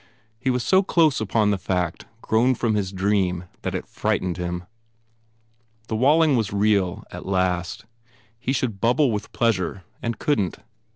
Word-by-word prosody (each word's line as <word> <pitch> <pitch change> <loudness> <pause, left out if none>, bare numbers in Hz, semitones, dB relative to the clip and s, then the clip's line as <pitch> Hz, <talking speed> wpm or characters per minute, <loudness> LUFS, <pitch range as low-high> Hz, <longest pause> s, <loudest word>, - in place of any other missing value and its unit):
He 130 - -1
was 125 -1 +1
so 190 0 +4
close 160 - +3
upon 105 0 +2
the 100 - 0
fact 90 -2 -2 0.2
grown 120 +4 +3
from 115 -1 0
his 100 -3 -1
dream 95 -2 0 0.2
that - - -3
it - - -3
frightened 90 -2 -1
him. 90 0 -3 1.3
The 110 - -1
Walling 145 +5 +4
was 110 -5 0
real, 100 -1 +1
at 90 - -8
last. 95 +2 -1 0.5
He 125 +2 -2
should 120 -7 -1
bubble 125 +3 +3
with 105 -1 -4
pleasure 95 -5 0 0.2
and 115 -1 -2
couldn 105 - 0
t. - - -15
105 Hz, 160 wpm, -23 LUFS, 95-125 Hz, 1.3 s, so